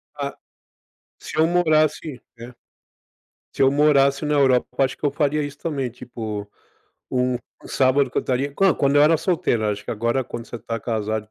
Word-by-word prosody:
Ah, 140 -1 -4 0.8
se - - -8
eu 160 +1 +4
morasse 155 -5 +1 0.2
é. 120 +2 -9 1.0
Seu 135 -1 +4
morasse 140 0 +3
na 150 0 0
Europa, 130 -3 +3
eu 135 - +5
acho 130 0 -2
que - - -10
eu 145 - +3
faria 150 +1 0
isso 145 0 -6
também, 140 -7 -3
tipo, 110 -4 -7 0.6
um 125 -1 0 0.3
sábado 135 +1 +2
que - - -3
eu - - +5
estaria 135 +2 -2
hã, 195 -3 +5
quando 140 0 +2
eu - - +7
era 155 +2 +5
solteiro, 160 - 0
acho 105 0 -3
que - - -4
agora 115 +4 0
quando 120 -2 -7
você 120 - -7
está 115 +1 -5
casado 110 -2 -2
135 Hz, 180 wpm, -22 LUFS, 120-150 Hz, 1.0 s, eu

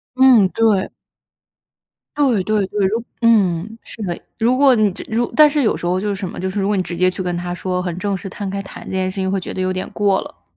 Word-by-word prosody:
嗯， 255 -7 +6
对。 215 -3 +1 1.3
对 255 -9 +2
对 210 -1 +1
对， 200 0 0
如 225 +4 -1 0.2
嗯， 215 -2 +2
是 225 - -10
的， 175 -4 -3 0.2
如 240 +3 +2
果 270 -2 +5
你 215 -2 +3
直 - - -9
如 235 +2 -1
但 305 -1 +7
是 295 -1 0
有 220 - +2
时 175 - -5
候 180 +1 +1
就 210 - -2
是 205 - 0
什 190 -2 -5
么， - - -9
就 190 +1 -2
是 200 +1 -2
如 195 - 0
果 210 - +1
你 185 - +1
直 180 - -6
接 185 +1 +3
去 185 - -5
跟 180 -1 -2
他 175 0 -4
说 180 0 -2
很 175 -2 -4
正 200 +1 -1
式 190 +2 -7
摊 200 +1 -6
开 195 0 -3
谈 195 - -11
这 - - -7
件 185 0 -1
事 - - -10
情， 190 -1 -1
会 195 - 0
觉 - - -7
得 185 - -4
有 185 0 0
点 185 - -4
过 200 -2 +1
了。 - - -12
195 Hz, 290 characters per minute, -19 LUFS, 185-220 Hz, 1.3 s, 但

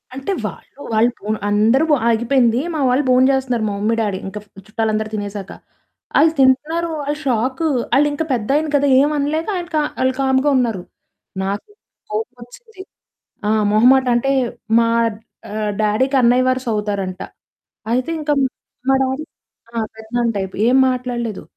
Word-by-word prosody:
అంటే 270 +9 -4
వాళ్ళూ, - - -9
వాళ్ళు 230 +3 +3
పోను 215 +1 -2
అందరూ 220 +7 +3
బ్ - - +6 0.2
ఆగిపోయింది. 240 +1 +2
మా 310 - -2
వాళ్ళు 260 +4 +2
భోంచేస్తున్నారు 255 -2 +2
మా 200 - -3
మమ్మీ, 220 +2 +1
డ్యాడీ 205 -3 -1
ఇంక 200 +2 -7
ఫ్ - - -34 0.2
చుట్టాలందరూ 215 0 -1
తినేసాక. 205 -1 -5 0.7
ఆళ్ళు 315 +1 +5
తింటున్నారు. 300 +6 +2 0.2
ఆళ్ళు 295 +1 -2
షాకు, 260 +5 0 0.3
ఆళ్ళింక 290 +2 +2
పెద్దాయన 275 +7 0
కదా! 285 0 +3
ఏం 290 +2 +3
అనలేక 300 +3 -1
ఆయనకా 345 -3 -2 0.2
ఆళ్ళు 260 0 +2
కామ్‌గా 265 +2 +2
ఉన్నారు. 230 -7 0 0.6
నాకు 200 +1 -3 0.4
కోపమొచ్చింది. 245 - -7 0.7
ఆ! - - +3 0.2
మొహమాటంటే 250 +3 +4 0.5
మా 230 - +3 0.6
ఆహ్, 210 0 -2
డ్యాడీకి 255 +6 +1
అన్నయ్య 245 +2 +4
వరుసవుతారంట. 210 -7 -2 0.7
అయితే 255 +5 0
ఇంక 300 -1 -2 0.6
మా 270 - +5
డ్యాడీ 265 +3 -2 0.5
ఆ! - - -3 0.2
పెదనాన్న 230 +2 -2
టైపు, 190 -1 -4
ఏం 255 +2 +4
మాట్లాడలేదు. 245 -4 -3
250 Hz, 135 wpm, -19 LUFS, 215-275 Hz, 0.7 s, బ్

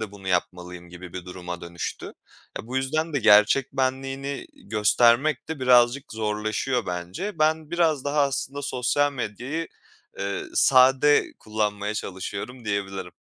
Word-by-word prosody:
de 105 -2 -5
bunu 95 -2 -9
yapmalıyım 90 -1 -3
gibi 90 0 -11
bir 90 -1 -7
duruma 90 -1 -7
dönüştü. 85 0 -6 0.5
E - - -15
bu 130 +2 -4
yüzden 155 +5 -1
de 145 - +1
gerçek 110 +5 +5
benliğini 135 +1 -2 0.2
göstermek 120 +8 +3
de 160 -4 -5
birazcık 125 +2 +4
zorlaşıyor 110 +3 -2
bence. 90 - -5
Ben 155 0 +1
biraz 160 -5 +1
daha 145 +1 +1
aslında 140 0 -2
sosyal 145 +2 0
medyayı, 130 +7 -4 0.5
eee, 100 0 -3
sade 135 +3 +5
kullanmaya 105 -1 -2
çalışıyorum 105 +6 -6
diyebilirim. 95 -3 -3
120 Hz, 130 wpm, -25 LUFS, 100-140 Hz, 0.5 s, gerçek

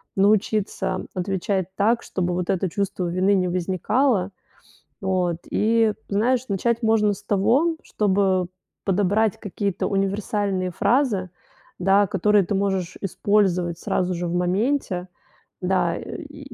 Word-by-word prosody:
научиться 210 +1 +1
отвечать 190 0 -1
так, 225 +4 +2
чтобы 180 -1 -2
вот 180 +1 -2
это 190 -1 0
чувство 195 0 -2
вины 185 +3 +2
не 185 -1 +1
возникало. 190 +4 +1 0.7
Вот. 185 -3 0
И, 225 0 +2
знаешь, 235 +5 +1
начать 235 +4 0
можно 220 -2 +3
с 200 +1 -11
того, 235 - +2
чтобы 190 -3 +1 0.4
подобрать 205 +2 +1
какие-то 200 -2 -2
универсальные 195 -1 -1
фразы, 215 -4 +1 0.5
да, 195 +2 +4
которые 200 +1 +3
ты 200 - -2
можешь 190 -3 -1
использовать 185 -3 +1
сразу 185 0 -1
же 175 0 -3
в 170 - -3
моменте. 185 +1 0 0.5
Да, 180 -2 +1
и 290 -4 -9
195 Hz, 120 wpm, -23 LUFS, 185-215 Hz, 0.7 s, да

